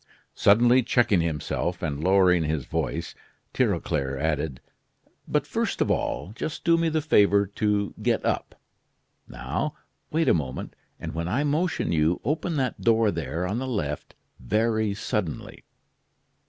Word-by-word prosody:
Suddenly 120 Hz, +5 st, +5 dB
checking 115 Hz, -6 st, +2 dB
himself, 85 Hz, +2 st, -2 dB
and 75 Hz, -2 st, -2 dB
lowering 90 Hz, -2 st, +4 dB
his 75 Hz, -3 st, -2 dB
voice, -, -, -3 dB, 0.4 s
Tirauclair 70 Hz, -2 st, 0 dB
added: 75 Hz, -2 st, -1 dB, 0.7 s
"But -, -, 0 dB
first -, -, -2 dB
of -, -, +2 dB
all, 95 Hz, -, -2 dB
just 155 Hz, +7 st, -5 dB
do 170 Hz, -1 st, +4 dB
me 165 Hz, 0 st, +1 dB
the 155 Hz, -1 st, -1 dB
favor 100 Hz, -7 st, +4 dB
to 100 Hz, 0 st, -1 dB
get -, -, 0 dB
up. -, -, -2 dB, 0.7 s
Now, -, -, -3 dB, 0.3 s
wait 160 Hz, 0 st, +1 dB
a -, -, +6 dB
moment, 70 Hz, -6 st, -3 dB, 0.2 s
and -, -, -6 dB
when 85 Hz, +1 st, -3 dB
I 120 Hz, +11 st, 0 dB
motion 150 Hz, -, 0 dB
you, 80 Hz, +1 st, +2 dB
open 155 Hz, +5 st, -1 dB
that 130 Hz, -4 st, -1 dB
door 115 Hz, -2 st, +3 dB
there, 85 Hz, +2 st, -3 dB
on 105 Hz, +6 st, -2 dB
the 130 Hz, -, -3 dB
left, 75 Hz, -, -3 dB, 0.2 s
very 110 Hz, -, 0 dB
suddenly. 100 Hz, -5 st, -4 dB
100 Hz, 140 wpm, -26 LUFS, 80-120 Hz, 0.7 s, a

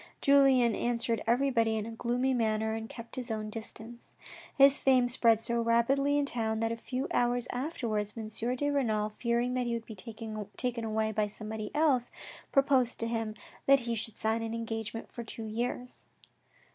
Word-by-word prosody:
Julien 270 Hz, -5 st, +5 dB
answered 235 Hz, -2 st, -1 dB
everybody 235 Hz, -3 st, +2 dB
in 215 Hz, -, -2 dB
a 230 Hz, -, -6 dB
gloomy 245 Hz, +3 st, 0 dB
manner 220 Hz, -2 st, +1 dB
and 225 Hz, 0 st, -5 dB
kept 230 Hz, +2 st, -9 dB
his 250 Hz, -1 st, -4 dB
own 215 Hz, -1 st, -3 dB
distance. 225 Hz, +1 st, -9 dB, 0.4 s
His 275 Hz, 0 st, +7 dB
fame 255 Hz, -2 st, +4 dB
spread 230 Hz, -3 st, +3 dB
so 235 Hz, +1 st, 0 dB
rapidly 270 Hz, +5 st, +2 dB
in 290 Hz, -, +2 dB
the -, -, -4 dB
town 220 Hz, -2 st, -1 dB
that 225 Hz, 0 st, 0 dB
a -, -, -1 dB
few 255 Hz, +4 st, -4 dB
hours 245 Hz, 0 st, +1 dB
afterwards 230 Hz, -7 st, -2 dB
M. 220 Hz, -1 st, -4 dB, 0.3 s
de 290 Hz, +3 st, 0 dB
Renal, 220 Hz, -7 st, +1 dB
fearing 235 Hz, +3 st, -1 dB
that 250 Hz, -1 st, 0 dB
he 235 Hz, -, 0 dB
would 230 Hz, -1 st, -5 dB
be 220 Hz, -, -8 dB
taken 220 Hz, +2 st, -5 dB
away 220 Hz, 0 st, 0 dB
by 215 Hz, -1 st, 0 dB
somebody 215 Hz, 0 st, -6 dB
else, 285 Hz, -6 st, +2 dB, 0.4 s
proposed 270 Hz, -3 st, +3 dB
to -, -, 0 dB
hinr 225 Hz, -2 st, -2 dB, 0.3 s
that 275 Hz, -1 st, +6 dB
he 235 Hz, 0 st, -2 dB
should 225 Hz, -1 st, -4 dB
sign 220 Hz, +1 st, 0 dB
an 225 Hz, 0 st, -3 dB
engagement 225 Hz, -1 st, -5 dB
for 235 Hz, -, -6 dB
two 225 Hz, 0 st, -7 dB
years. 245 Hz, +3 st, -4 dB
230 Hz, 180 wpm, -30 LUFS, 220-250 Hz, 0.4 s, His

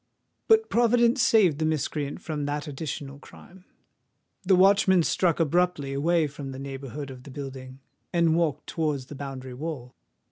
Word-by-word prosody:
But 445 Hz, 0 st, +5 dB
Providence 240 Hz, +2 st, +3 dB
saved 210 Hz, -, +4 dB
the 155 Hz, -, +1 dB
miscreant 150 Hz, -2 st, -2 dB
from 150 Hz, -3 st, -4 dB
that 145 Hz, +1 st, -3 dB
additional 140 Hz, -1 st, -6 dB
crime:—the 185 Hz, +2 st, -6 dB
watchman 190 Hz, -1 st, +5 dB
struck 170 Hz, 0 st, +1 dB
abruptly 165 Hz, -3 st, +1 dB
away 160 Hz, +4 st, +2 dB
from 140 Hz, -1 st, -7 dB
the 130 Hz, -, -8 dB
neighbourhood 135 Hz, 0 st, -7 dB
of 130 Hz, -1 st, -11 dB
the 135 Hz, -, -12 dB
building, 135 Hz, -1 st, -8 dB, 0.3 s
and 170 Hz, -2 st, +3 dB
walked 155 Hz, -4 st, 0 dB
towards 150 Hz, -5 st, -2 dB
the 145 Hz, -, -10 dB
boundary 135 Hz, -2 st, -7 dB
wall. 130 Hz, -3 st, -6 dB
150 Hz, 145 wpm, -26 LUFS, 135-175 Hz, 0.3 s, But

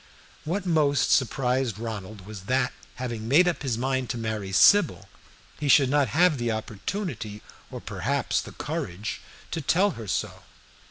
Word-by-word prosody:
What 185 Hz, +5 st, -2 dB
most 150 Hz, -5 st, +2 dB
surprised 125 Hz, -2 st, +1 dB
Ronald 110 Hz, -3 st, -6 dB
was 100 Hz, -3 st, -9 dB
that, 130 Hz, +2 st, +1 dB, 0.2 s
having 120 Hz, -3 st, -5 dB
made 160 Hz, +9 st, +5 dB
up 175 Hz, -, 0 dB
his 130 Hz, -6 st, -1 dB
mind 130 Hz, 0 st, -1 dB
to -, -, -2 dB
marry 110 Hz, -4 st, -3 dB
Sybil, 165 Hz, -, +5 dB, 0.5 s
he 150 Hz, -, -2 dB
should 135 Hz, -2 st, +5 dB
not 145 Hz, -2 st, +3 dB
have 180 Hz, +4 st, +4 dB
had 145 Hz, -, -5 dB
the 120 Hz, -1 st, 0 dB
opportunity, 110 Hz, -, -4 dB, 0.3 s
or -, -, -7 dB
perhaps -, -, -1 dB
the -, -, -10 dB
courage, 95 Hz, +5 st, -4 dB, 0.3 s
to 165 Hz, -, -2 dB
tell 185 Hz, +8 st, +3 dB
her 115 Hz, -, -8 dB
so. -, -, -2 dB
125 Hz, 160 wpm, -26 LUFS, 110-150 Hz, 0.5 s, made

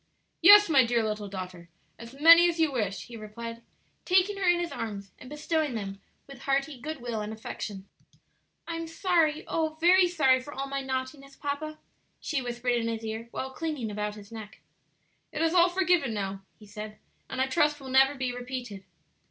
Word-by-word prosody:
"Yes, 415 Hz, +4 st, +9 dB
my 280 Hz, -5 st, +5 dB
dear 235 Hz, -1 st, +1 dB
little 210 Hz, -1 st, -3 dB
daughter, 185 Hz, -3 st, -8 dB, 0.3 s
as 235 Hz, +4 st, -11 dB
many 335 Hz, +3 st, +8 dB
as 335 Hz, -1 st, -4 dB
you 320 Hz, -2 st, +3 dB
wish," 210 Hz, -7 st, -2 dB
he 240 Hz, -, -11 dB
replied, 230 Hz, +2 st, -8 dB, 0.4 s
taking 375 Hz, +2 st, +2 dB
her 380 Hz, -2 st, +2 dB
in 350 Hz, -, +4 dB
his 345 Hz, -1 st, -3 dB
arms 200 Hz, -4 st, -6 dB
and 255 Hz, -, -11 dB
bestowing 300 Hz, -2 st, -1 dB
them 195 Hz, -2 st, -5 dB, 0.2 s
with 275 Hz, -2 st, -12 dB
hearty 275 Hz, 0 st, -1 dB
good 310 Hz, 0 st, -6 dB
will 235 Hz, -3 st, -3 dB
and 210 Hz, +1 st, -5 dB
affection. 205 Hz, -2 st, -7 dB, 0.8 s
"I'm 330 Hz, 0 st, -4 dB
sorry 330 Hz, -2 st, +1 dB
oh, 315 Hz, -1 st, -1 dB
very 360 Hz, +2 st, +5 dB
sorry 275 Hz, -7 st, +3 dB
for 290 Hz, +3 st, -10 dB
all 275 Hz, -, -3 dB
my 275 Hz, 0 st, -3 dB
naughtiness, 265 Hz, +1 st, -5 dB
papa," 295 Hz, +2 st, -4 dB, 0.4 s
she 290 Hz, -4 st, -2 dB
whispered 245 Hz, 0 st, -2 dB
in 230 Hz, -1 st, -1 dB
his 225 Hz, -1 st, -3 dB
ear 220 Hz, +1 st, -5 dB
while 265 Hz, +2 st, -5 dB
clinging 295 Hz, -7 st, -3 dB
about 210 Hz, 0 st, -3 dB
his 205 Hz, 0 st, -13 dB
neck. 220 Hz, -2 st, -10 dB, 0.7 s
"It -, -, -2 dB
is 330 Hz, 0 st, +2 dB
all 355 Hz, 0 st, +5 dB
forgiven 355 Hz, -9 st, +1 dB
now," 195 Hz, -1 st, -4 dB, 0.2 s
he 215 Hz, -, -15 dB
said, 210 Hz, +1 st, -8 dB, 0.3 s
"and 260 Hz, -, -5 dB
I 260 Hz, -, +3 dB
trust 300 Hz, +2 st, +1 dB
will 270 Hz, -1 st, -9 dB
never 270 Hz, +2 st, +4 dB
be 260 Hz, -2 st, -2 dB
repeated." 245 Hz, -5 st, -6 dB
265 Hz, 185 wpm, -28 LUFS, 220-315 Hz, 0.8 s, Yes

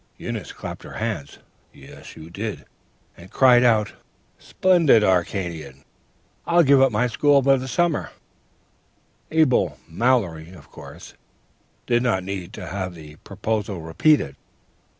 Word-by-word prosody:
"Eunice -, -, -6 dB
clapped -, -, -8 dB
her -, -, -11 dB
hands 70 Hz, -1 st, -5 dB, 0.3 s
(yes, -, -, -14 dB
you 80 Hz, +1 st, -12 dB
did!) 105 Hz, +4 st, -6 dB, 0.5 s
and 85 Hz, +2 st, -15 dB
cried 125 Hz, 0 st, +5 dB
out, 110 Hz, -3 st, +2 dB, 0.5 s
"'Splendid! 170 Hz, -12 st, +3 dB
Arcadian! 85 Hz, -7 st, -2 dB, 0.6 s
I'll 170 Hz, 0 st, +4 dB
give 140 Hz, -2 st, +5 dB
up 135 Hz, -1 st, +4 dB
my 110 Hz, +3 st, +1 dB
school 140 Hz, +3 st, +2 dB
for 135 Hz, 0 st, +4 dB
the 130 Hz, 0 st, -6 dB
summer.'... 165 Hz, +5 st, 0 dB, 1.2 s
"Abel 155 Hz, -5 st, +2 dB
Mallory, 90 Hz, -4 st, -1 dB
of 80 Hz, -6 st, -16 dB
course, -, -, -12 dB, 0.7 s
did 120 Hz, -1 st, +1 dB
not 110 Hz, -7 st, 0 dB
need 95 Hz, -2 st, -6 dB
to -, -, -8 dB
have 95 Hz, -1 st, -5 dB
the 75 Hz, -2 st, -13 dB
proposal 105 Hz, -1 st, -4 dB
repeated. 80 Hz, -, +1 dB
105 Hz, 130 wpm, -22 LUFS, 85-130 Hz, 1.2 s, cried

